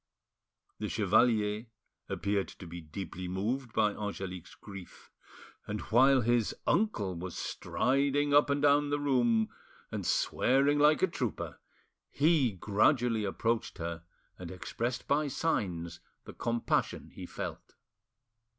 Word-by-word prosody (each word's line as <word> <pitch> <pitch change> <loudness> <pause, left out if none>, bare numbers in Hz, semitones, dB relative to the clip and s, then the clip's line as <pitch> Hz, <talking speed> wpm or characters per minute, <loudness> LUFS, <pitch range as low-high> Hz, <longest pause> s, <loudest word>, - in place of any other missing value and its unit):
The - - -3
chevalier 110 +1 +2 0.4
appeared 100 -1 -1
to - - -11
be 85 +1 -8
deeply 90 +3 -6
moved 115 +8 -2
by 105 -2 +2
Angelique's 95 -4 -6
grief, 100 -3 -12 0.6
and 105 0 -3
while 130 +3 +6
his, 120 -1 +1
uncle 170 - +1
was 90 +1 -6
striding 140 +2 0
up 145 0 +5
and 140 0 0
down 145 0 +4
the 145 0 0
room 120 -6 +2 0.4
and - - -3
swearing 140 +3 +2
like 150 +4 +5
a - - +6
trooper, 125 - -4 0.5
he 145 -4 +3
gradually 110 - +2
approached 115 +3 -1
her 85 0 -4 0.4
and 90 -2 -7
expressed 115 +7 -4
by 150 +1 +2
signs 90 - -2 0.2
the - - -10
compassion 115 0 -1
he - - -9
felt. - - -7
115 Hz, 125 wpm, -31 LUFS, 95-140 Hz, 0.6 s, while